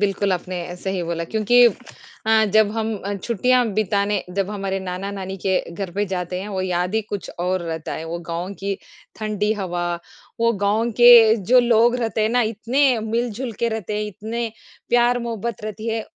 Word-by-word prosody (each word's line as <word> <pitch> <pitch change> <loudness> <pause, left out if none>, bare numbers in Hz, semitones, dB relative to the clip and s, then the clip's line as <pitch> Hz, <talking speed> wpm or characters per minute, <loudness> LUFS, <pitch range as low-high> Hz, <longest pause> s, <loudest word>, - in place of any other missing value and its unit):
बिल्कुल 200 -1 +1
आपने 180 -1 -4
सही 190 0 -3
बोला 170 0 -3
क्योंकि 220 +6 +4 0.6
अ, 220 0 +5
जब 215 -1 +5
हम 225 0 -2
अ, 200 +1 -2
छुट्टियाँ 245 +5 +1
बिताने 205 -1 0
जब 195 0 0
हमारे 195 -2 -2
नाना-नानी 190 +1 -5
के 190 -1 +3
घर 190 +1 -5
पे 205 +3 0
जाते 180 -1 -3
हैं, 200 - -6
वो 195 -2 -3
याद 180 +1 -1
ही 220 - +3
कुछ 205 -2 -6
और 180 +1 0
रहता 160 -1 -5
है, 160 - -5
वो 165 +1 -4
गाँव 170 +3 -3
की 200 0 -1 0.4
ठंडी 215 -1 -1
हवा, 175 -4 -3 0.5
वो 230 0 +3
गाँव 215 +4 +1
के 235 -2 +9 0.2
जो 255 - +8
लोग 240 0 +4
रहते 225 -3 -2
हैं 215 - +2
ना 245 +2 +2
इतने 235 +4 +1
मिलजुल 230 +2 -2
के 235 - +2
रहते 220 -2 -4
हैं, 210 - -1
इतने 220 +3 -4 0.4
प्यार 240 0 +3
मोहब्बत 235 -2 -4
रहती 215 +1 -5
है, 225 -1 -2
210 Hz, 180 wpm, -22 LUFS, 190-230 Hz, 0.6 s, के